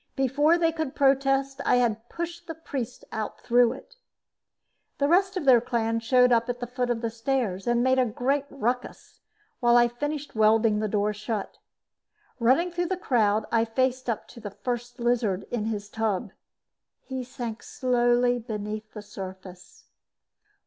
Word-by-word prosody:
Before 290 +5 +3
they 330 -1 +2
could 315 -4 -4
protest, 270 0 +2
I - - +3
had 235 -2 0
pushed 340 0 -6
the 325 - -5
priests 275 -7 -6
out 215 -1 -4
through 240 0 +3
it. 270 - -14 1.0
The 280 - +2
rest 380 +4 +3
of 355 - -3
their 250 -3 +7
clan 230 -2 -1
showed 250 +2 +4
up 235 0 +3
at 245 0 -2
the 245 - -3
foot 250 0 -2
of 235 -1 -1
the 230 -1 -2
stairs 225 -5 -2
and 240 0 +2
made 260 0 +3
a 255 - +4
great 270 +5 0
ruckus 250 -2 -4 0.4
while 240 -1 +5
I 240 0 +6
finished 290 +4 -4
welding 220 0 +3
the 215 - 0
door 210 0 0
shut. 215 0 -5 0.8
Running 265 +10 +3
through 350 0 -1
the 375 - -2
crowd, 215 - +1
I 230 -1 +3
faced 255 +2 -1
up 225 - -2
to - - -12
the 215 -2 -6
First 245 +3 -5
Lizard 235 -5 +1
in 225 -3 -1
his 210 -2 -3
tub. 215 -3 -2 0.7
He 260 -1 -5
sank 235 -3 -6
slowly 245 -1 +1
beneath 215 -1 -6
the 210 - -8
surface. 190 -2 -10
240 Hz, 165 wpm, -26 LUFS, 220-270 Hz, 1.0 s, their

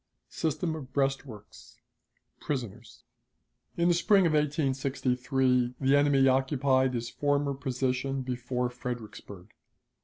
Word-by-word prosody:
System 160 +1 -2
of 135 -4 -9
Breastworks. 135 -6 -4 0.6
Prisoners. 125 -9 -6 0.7
In 170 0 +2
the 175 - +4
spring 195 +2 +4
of 165 - +2
1863 130 -4 0
the 135 +1 +3
enemy 145 -2 +4
occupied 130 -1 +2
his 115 0 -4
former 145 -1 0
position 130 0 -2
before 125 0 -2
Fredericksburg. 115 -5 -8
135 Hz, 100 wpm, -28 LUFS, 125-145 Hz, 0.7 s, the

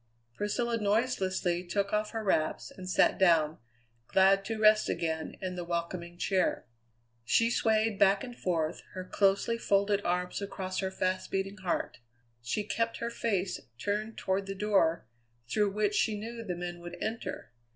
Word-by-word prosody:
Priscilla 230 - -1
noiselessly 195 -5 +1
took 200 +3 -1
off 210 0 +1
her 225 -1 -4
wraps 160 -6 0
and 185 -1 -8
sat - - +3
down, 165 -4 +4 0.5
glad 195 +1 +4
to 225 +2 -3
rest 215 0 +5
again 160 -1 -2
in 185 -1 -2
the 175 - -4
welcoming 170 0 -4
chair. 190 +1 +1 0.6
She 230 - +3
swayed 220 -2 +2
back 195 0 +5
and 245 -2 -7
forth, 165 -7 -1
her 185 0 -5
closely 200 +4 +2
folded 200 -1 +2
arms 180 +2 -1
across 190 -2 -4
her 190 - -1
fast 185 0 -1
beating 195 +1 -2
heart. 185 -8 -2 0.4
She 125 - -1
kept 230 +2 -1
her 235 0 -3
face 195 -6 -1 0.2
turned 210 - -2
toward 190 +1 -1
the 195 - -4
door 190 - +2 0.4
through 210 - +2
which 210 +1 0
she 215 0 +1
knew 230 +2 -6
the 180 -5 -3
men 175 0 -5
would 175 0 -8
enter. 225 +1 -4
195 Hz, 160 wpm, -30 LUFS, 180-215 Hz, 0.6 s, rest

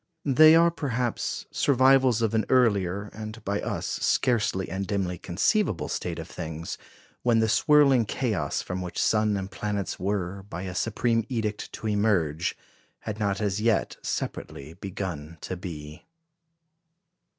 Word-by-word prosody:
They 155 +3 +7
are, 170 +1 +5
perhaps, 125 -7 -2
survivals 130 -3 +4
of 110 -1 +1
an 110 -2 +2
earlier, 100 -5 +2
and 110 +1 -8
by 100 +1 -1
us - - -3
scarcely 105 -6 +1
and 95 +1 -4
dimly 95 -4 -2
conceivable 105 - 0
state - - -3
of - - -6
things, 80 -1 -6 0.4
when 120 -2 +3
the 110 0 +3
swirling 135 0 +5
chaos 105 - -1
from 90 0 -4
which 90 -1 -5
sun 105 -1 +2
and 95 0 -5
planets 100 -1 -3
were, 95 0 -2
by 90 +2 -5
a 95 -1 -5
supreme 115 +4 +1
edict, 110 -4 -3
to 110 - -5
emerge, 100 -7 +1 0.4
had 110 -1 -5
not 100 -2 0
as 105 0 0
yet 110 -2 +1
separately 70 +4 -5
begun 90 -4 -6
to 95 - -4
be. 80 -3 -8
105 Hz, 140 wpm, -26 LUFS, 90-115 Hz, 0.4 s, They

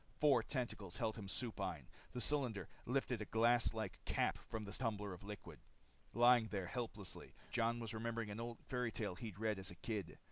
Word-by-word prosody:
Four 140 -5 +6
tentacles 115 -7 -3
held 110 -2 +1
him 100 -3 -6
supine. 95 - -1 0.3
The 125 - -2
cylinder 120 - +1 0.2
lifted 125 -2 +1
a - - -1
glass 115 +2 +4
like 110 -4 -4
cap - - +2
from 110 -1 -2
the 100 - -6
tumbler 105 -4 -1
of 90 - -10
liquid. 95 -7 -7 0.6
Lying 120 -1 +7
there 100 -4 -1
helplessly, 110 -2 -4 0.2
Jon 115 0 +2
was 115 -2 -4
remembering 115 -1 -1
an 105 - -4
old 115 0 -3
fairy 125 -2 0
tale 105 -5 -1
he'd 105 0 -6
read 110 -2 +1
as 95 0 -2
a 85 - -7
kid. 105 +2 -3
110 Hz, 185 wpm, -41 LUFS, 100-120 Hz, 0.6 s, Lying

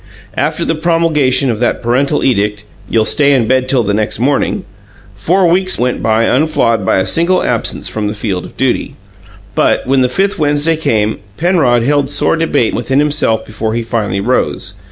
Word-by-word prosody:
After - - -1
the - - 0
promulgation 155 -5 +1
of 110 - -4
that 120 - -1
parental 135 +5 +1
edict, 105 -4 0 0.3
"You'll 110 -1 +2
stay 140 +4 +3
in 125 -4 +2
bed 130 +2 +1
till 130 -3 +2
the 100 -1 -1
next 105 +1 -1
morning", 135 +3 0 0.5
four 180 - +1
weeks 185 +2 +2
went 125 +1 -1
by 110 0 +2
unflawed 125 -5 +1
by 95 - +1
a 95 - +1
single 175 - +1
absence - - -1
from 105 -1 -3
the 105 - -4
field 100 -4 -3
of - - -12
duty; - - -1 0.6
but, - - +1
when 135 +1 +2
the 125 - +2
fifth 195 +7 -1
Wednesday 150 +2 +1
came, 110 -8 -1 0.2
Penrod 155 -10 +2
held 145 +1 +1
sore 145 - +1
debate 145 -7 0
within 130 +3 -1
himself 145 -6 +1
before 110 +1 -4
he 115 - -1
finally 105 -4 -2
rose. 100 - -1
130 Hz, 180 wpm, -13 LUFS, 110-155 Hz, 0.6 s, stay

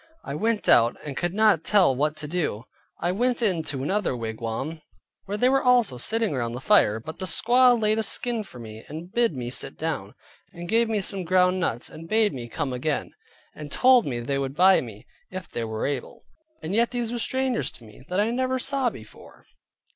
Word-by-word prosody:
I - - -6
went 220 +7 -1
out, 115 0 +5
and 140 -2 -5
could 175 +4 -2
not 215 -6 +4
tell 185 -10 +4
what 150 +3 0
to 150 - -4
do, 150 -10 -2 0.4
but 175 - -1
I - - +2
went 245 +5 0
in 185 -7 +2
to 135 -2 -4
another 190 -5 -1
wigwam, 115 +7 -4 0.4
where 200 +2 -3
they 245 - +3
were 270 +1 +3
also 245 - +3
sitting 225 - -1
round 120 -3 -2
the - - -5
fire, 130 - +4
but 155 +8 -9
the 185 - -3
squaw 245 +7 +5
laid 215 0 +1
a - - +2
skin 235 +2 0
for 160 - -12
me, 110 -2 -10
and 165 +4 -8
bid 235 -9 +2
me 120 -1 -5
sit 135 - -4
down, 150 -11 -4 0.4
and 175 0 -8
gave 230 +3 +2
me 215 -2 0
some 190 0 -3
ground 180 +1 +3
nuts, 120 -9 -1
and 165 +1 -11
bade 220 -1 +3
me 120 -2 -7
come 140 0 -3
again; 145 +4 -2 0.4
and 150 -2 -9
told 255 - +5
me 120 -3 -2
they 135 +4 -2
would 135 0 -3
buy 185 +3 +5
me, 115 -1 -10 0.2
if 185 0 -7
they 120 - -4
were 110 0 -3
able, 140 -3 -4 0.4
and 160 +4 -4
yet 230 +2 +3
these 240 -2 -3
were 240 - -1
strangers 260 0 0
to - - -13
me 110 +2 -15
that 180 +2 0
I 215 +3 +2
never 260 +1 0
saw 265 0 0
before. 110 - -14
175 Hz, 215 wpm, -25 LUFS, -, 0.4 s, out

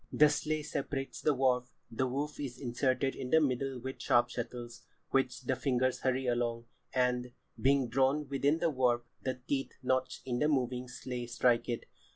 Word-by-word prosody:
"The 150 0 +6
sley 155 0 -1
separates 140 -2 -3
the 150 - +3
warp, 125 -1 +2 0.2
the 130 +3 0
woof 145 +4 -3
is 130 -4 -4
inserted 130 +1 0
in 125 - -5
the 160 - +6
middle 135 -2 0
with 130 0 -6
sharp 120 0 +3
shuttles, 120 0 -6 0.3
which 135 -1 +1
the 130 +1 0
fingers 130 -1 +1
hurry 130 0 0
along, 120 -1 0 0.3
and, 125 -1 +1 0.3
being 135 -1 +4
drawn 135 +4 +2
within 140 +3 +2
the 165 -1 +1
warp, 125 -3 +2 0.2
the 130 -1 -3
teeth 135 -1 -1
notched 130 0 0
in 125 -2 -1
the 150 - +3
moving 125 -3 0
sley 125 -1 -5
strike 120 0 +2
it. 120 - -2
130 Hz, 175 wpm, -32 LUFS, 125-135 Hz, 0.3 s, The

